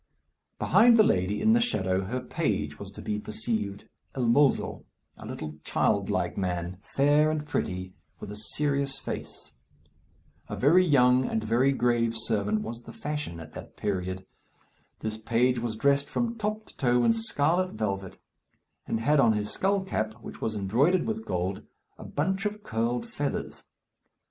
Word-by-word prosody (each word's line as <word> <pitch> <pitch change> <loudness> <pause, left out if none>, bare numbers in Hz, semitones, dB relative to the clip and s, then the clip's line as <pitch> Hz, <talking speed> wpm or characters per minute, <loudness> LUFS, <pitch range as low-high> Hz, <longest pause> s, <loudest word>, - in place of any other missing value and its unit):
Behind 235 0 +5
the 215 - +8
lady, 95 - +1
in 220 - +5
the 235 - +5
shadow, 95 - +1
her 125 +6 -3
page 125 - -2
was - - -7
to - - -9
be 105 0 -2
perceived, 105 -2 -3 0.3
el 130 -2 0
mozo, 135 +4 +2 0.3
a - - -9
little 75 -1 -6
child - - +1
like - - 0
man, 90 -1 -2
fair 145 +5 +3
and 155 -1 -2
pretty, 95 -9 -3 0.3
with - - -7
a - - -6
serious 140 +5 -1
face. - - -7 1.0
A - - -3
very 165 +8 +5
young 130 -5 +4
and 110 - -1
very 120 +5 +3
grave 120 -3 +1
servant 105 -1 0
was 115 +1 -6
the - - -11
fashion 150 - -4
at 80 -1 -11
that - - -10
period. 95 -2 -3 0.8
This 110 0 -3
page 120 +3 +2
was 115 -2 -3
dressed 140 +4 +2
from 235 0 -1
top 215 0 -3
to - - -15
toe 125 -2 +3
in 230 - +5
scarlet 185 -5 +1
velvet, 95 -3 -3 0.7
and 115 - -1
had 145 +5 +3
on 115 -4 +5
his 105 -1 -2
skull 195 0 +1
cap, 110 - -2
which 115 - -11
was 110 -1 -1
embroidered 130 - +2
with 220 0 -3
gold, 90 +2 -2 0.4
a - - -8
bunch 190 +7 -1
of 210 0 -7
curled 115 +2 -1
feathers. 145 -1 -4
120 Hz, 165 wpm, -28 LUFS, 105-150 Hz, 1.0 s, the